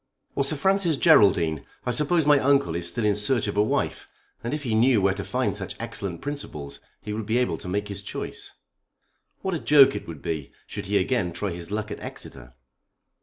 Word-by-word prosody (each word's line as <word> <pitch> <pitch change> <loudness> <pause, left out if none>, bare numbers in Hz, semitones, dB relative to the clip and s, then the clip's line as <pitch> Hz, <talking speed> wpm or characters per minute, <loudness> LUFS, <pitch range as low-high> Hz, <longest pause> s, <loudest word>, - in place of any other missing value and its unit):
"Or 140 - +1
Sir 140 +3 -1
Francis 185 0 +2
Geraldine. 95 - +4 0.2
I 125 - +1
suppose 150 +5 +2
my 145 -1 +6
uncle 135 -11 +3
is 85 0 -1
still 105 +6 -2
in 105 - +4
search 105 +3 +2
of 105 - -3
a 105 - +4
wife, 105 - -1 0.4
and 120 - -3
if 150 0 -3
he 120 -5 -1
knew 115 +1 +4
where 95 -1 +2
to 100 0 -5
find - - -1
such - - -5
excellent 95 -4 -3
principles 75 - -6 0.2
he 105 - -4
would 110 -1 -4
be 115 +2 +1
able 125 0 0
to - - -8
make 100 +2 -1
his 100 -3 -5
choice. - - -6 0.9
What 190 - -1
a 165 - -1
joke 140 -3 +6
it - - -6
would 80 -4 -9
be 80 -4 -4
should 100 -2 -7
he 100 +1 +2
again 95 -3 0
try 95 +3 -3
his 85 0 -7
luck 105 +1 -3
at - - -5
Exeter?" - - -8
105 Hz, 215 wpm, -25 LUFS, 90-140 Hz, 0.9 s, my